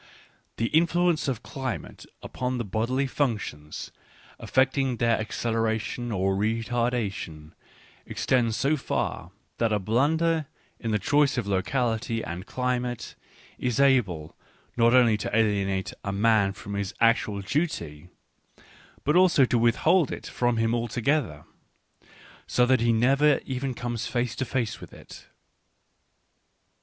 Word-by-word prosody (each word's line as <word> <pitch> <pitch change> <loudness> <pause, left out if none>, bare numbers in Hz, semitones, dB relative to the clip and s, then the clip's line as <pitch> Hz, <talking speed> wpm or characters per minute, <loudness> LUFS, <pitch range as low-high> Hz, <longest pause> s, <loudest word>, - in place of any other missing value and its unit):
The 115 - 0
influence 170 0 +2
of 125 -3 -2
climate 130 -3 -6 0.2
upon 125 0 -3
the 120 - -3
bodily 120 +7 0
functions, 110 - -3 0.5
affecting 130 -1 +1
their 115 -1 +2
acceleration 115 +1 -2
or 95 -1 0
re 110 +3 0
tardation, 110 -10 -2 0.6
extends 115 -4 0
so 150 +3 +1
far, 90 - -3 0.3
that 115 -2 +2
a 105 - +3
blunder 150 - +1 0.3
in 115 - -4
the 105 - +2
choice 145 +6 +2
of 120 - -1
locality 115 +3 -1
and 90 +4 -6
climate 125 -2 -2 0.5
is 125 0 -1
able 105 - +2 0.4
not 115 +1 +4
only 120 -4 +5
to 105 - -3
alienate 100 -3 0
a 100 - -2
man 100 -1 +3
from 100 0 -8
his 100 +1 -3
actual 115 -3 +2
duty, 95 - -3 1.0
but 150 - +1
also 180 -7 +5
to 120 -1 +1
withhold 150 +8 +3
it - - -6
from 120 -1 0
him 115 0 +1
altogether, 120 - -1 1.0
so 125 - +3
that 130 -1 +3
he 115 0 +3
never 135 +6 +3
even 130 0 -3
comes 120 -2 -3
face 120 -1 -1
to 130 - -1
face 120 -3 -2
with - - -11
it. - - -13
120 Hz, 130 wpm, -26 LUFS, 105-130 Hz, 1.0 s, only